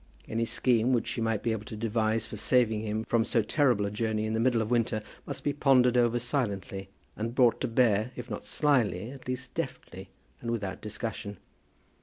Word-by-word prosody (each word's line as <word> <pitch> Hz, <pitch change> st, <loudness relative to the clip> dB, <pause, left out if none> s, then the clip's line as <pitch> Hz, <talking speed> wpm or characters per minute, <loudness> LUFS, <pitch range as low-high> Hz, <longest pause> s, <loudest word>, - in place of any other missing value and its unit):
Any 115 Hz, +1 st, 0 dB
scheme, 120 Hz, +1 st, +2 dB
which 120 Hz, -, +1 dB
she 115 Hz, -, -3 dB
might 115 Hz, -2 st, 0 dB
be 115 Hz, -, +1 dB
able 110 Hz, -1 st, -3 dB
to 110 Hz, -, -7 dB
devise 110 Hz, 0 st, 0 dB
for -, -, -8 dB
saving 110 Hz, -4 st, +2 dB
him 110 Hz, 0 st, -2 dB
from 115 Hz, 0 st, +2 dB
so 115 Hz, 0 st, +1 dB
terrible 120 Hz, -3 st, +2 dB
a 100 Hz, -, -2 dB
journey 110 Hz, 0 st, -1 dB
in 110 Hz, -, -2 dB
the 110 Hz, -, 0 dB
middle 120 Hz, 0 st, +3 dB
of 110 Hz, +1 st, -2 dB
winter, 115 Hz, -2 st, +1 dB, 0.2 s
must -, -, -5 dB
be 145 Hz, -, +1 dB
pondered 125 Hz, -4 st, +4 dB
over 120 Hz, -1 st, +3 dB
silently, 100 Hz, -7 st, -2 dB, 0.3 s
and 115 Hz, +3 st, -4 dB
brought 125 Hz, -3 st, +4 dB
to -, -, +1 dB
bear, 115 Hz, -2 st, +3 dB
if -, -, -7 dB
not -, -, -5 dB
slyly, 120 Hz, -7 st, +1 dB
at 135 Hz, -2 st, -12 dB
least 125 Hz, 0 st, -4 dB
deftly, 100 Hz, -, -5 dB, 0.3 s
and 120 Hz, -, -4 dB
without 105 Hz, -5 st, -3 dB
discussion. 105 Hz, -1 st, -5 dB
115 Hz, 200 wpm, -29 LUFS, 110-125 Hz, 0.3 s, pondered